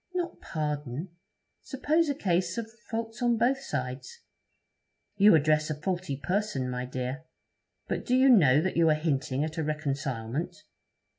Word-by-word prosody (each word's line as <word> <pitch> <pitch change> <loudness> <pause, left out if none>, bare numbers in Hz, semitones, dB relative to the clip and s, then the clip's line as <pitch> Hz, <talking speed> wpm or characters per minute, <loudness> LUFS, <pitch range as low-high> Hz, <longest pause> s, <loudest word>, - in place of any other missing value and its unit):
'Not 350 -1 -3
pardon. 150 0 -3 0.5
Suppose 305 +4 0
a 285 - 0
case 185 -3 0
of 225 -1 -4 0.2
faults 225 +1 -4
on 240 -1 +2
both 250 +4 +2
sides.' 130 - -5 1.0
'You 205 -2 +7
address 155 0 +2
a 150 -1 -3
faulty 175 -4 -2
person, 180 -7 -1
my 125 0 -3
dear. 130 +4 -4 0.6
But - - -2
do 250 - +3
you 265 +1 +5
know 150 - +6
that 185 - -2
you 165 -1 +5
are 155 - +4
hinting 140 -3 -1
at 155 +1 -4
a - - 0
reconcilement?' 140 -2 -3
160 Hz, 150 wpm, -28 LUFS, 140-225 Hz, 1.0 s, You